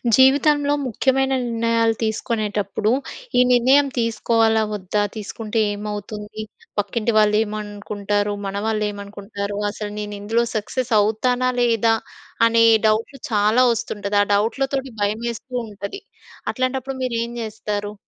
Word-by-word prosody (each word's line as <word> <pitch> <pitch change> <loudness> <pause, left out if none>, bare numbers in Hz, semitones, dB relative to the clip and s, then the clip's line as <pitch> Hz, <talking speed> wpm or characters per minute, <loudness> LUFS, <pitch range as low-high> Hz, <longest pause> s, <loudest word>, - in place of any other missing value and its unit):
జీవితంలో 285 +2 +4
ముఖ్యమైన 265 +3 +1
నిర్ణయాలు 230 -1 +1
తీసుకునేటప్పుడు, 215 -1 -1 0.5
ఈ - - +7
నిర్ణయం 260 +4 +5
తీసుకోవాలా 225 -1 +2
వొద్దా? 205 +1 -1
తీసుకుంటే 220 +1 -4
ఏమవుతుంది? 210 +1 -6 0.4
పక్కింటి 215 +3 -1
వాళ్ళు 210 0 +4
ఏమనుకుంటారు? 205 -1 -3
మన 195 - -4
వాళ్ళు 215 -1 0
ఏమనుకుంటారు? 200 0 -6
అసలు 210 0 -6
నేనిందులో 210 +3 -1
సక్సెస్ 240 +4 -2
అవుతానా 245 +4 +1
లేదా? 230 -1 +3 0.5
అనే 230 0 +4 0.2
డౌట్లు 225 +5 0
చాలా 215 +4 +4
వస్తుంటది. 205 -2 -2
ఆ - - -3
డౌట్లతోటి 265 +6 0
భయమేస్తూ 225 +4 -2
ఉంటది. 205 - -7 0.5
అట్లాంటప్పుడు 260 +1 -2
మీరేం 235 -1 -2
జేస్తారు? 210 -2 -4
220 Hz, 105 wpm, -21 LUFS, 205-240 Hz, 0.5 s, ఈ